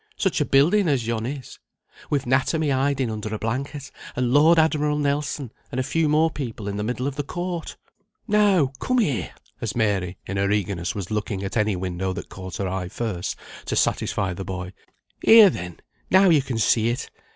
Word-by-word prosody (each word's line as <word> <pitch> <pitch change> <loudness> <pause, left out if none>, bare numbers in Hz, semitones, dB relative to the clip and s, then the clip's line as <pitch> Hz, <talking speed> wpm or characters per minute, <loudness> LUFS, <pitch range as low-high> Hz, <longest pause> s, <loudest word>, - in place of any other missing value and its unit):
Such 190 -6 0
a - - +2
building 170 +10 +4
as 135 -6 +1
yon 115 0 -2
is! 135 -2 -7 0.5
with 140 -2 0
'natomy 140 +4 +1
hiding 135 -2 0
under 110 0 -4
a - - -3
blanket, 135 +6 -4 0.2
and 125 0 0
Lord 160 +4 +6
Admiral 150 -2 +2
Nelson, 145 -3 -1 0.2
and 125 - -2
a - - +1
few 160 +3 +1
more 155 +2 +3
people 115 -8 -5
in 100 - -3
the 105 - -2
middle 125 +3 -2
of 140 0 -3
the 145 - -1
court! 175 +2 -5 0.5
No! 200 - +3
come 255 - 0
here," 150 - 0 0.3
as - - -3
Mary, 100 -5 0
in 100 - -4
her 100 0 +1
eagerness, 100 -4 -1
was 100 -1 -5
looking 105 -2 -2
at 95 - -4
any 105 -3 +2
window 95 +1 -3
that - - -7
caught 95 -1 -7
her 100 - -2
eye 90 -1 -3
first, 100 -4 -3 0.3
to - - -2
satisfy 95 -2 0
the 95 - -6
boy. 90 0 -6 0.5
"Here, 220 -4 +9
then, 90 - -7 0.3
now 190 0 +6
you 155 -3 +5
can 130 -3 -4
see 110 +1 +3
it. 120 +2 -3
125 Hz, 195 wpm, -24 LUFS, 100-150 Hz, 0.5 s, Here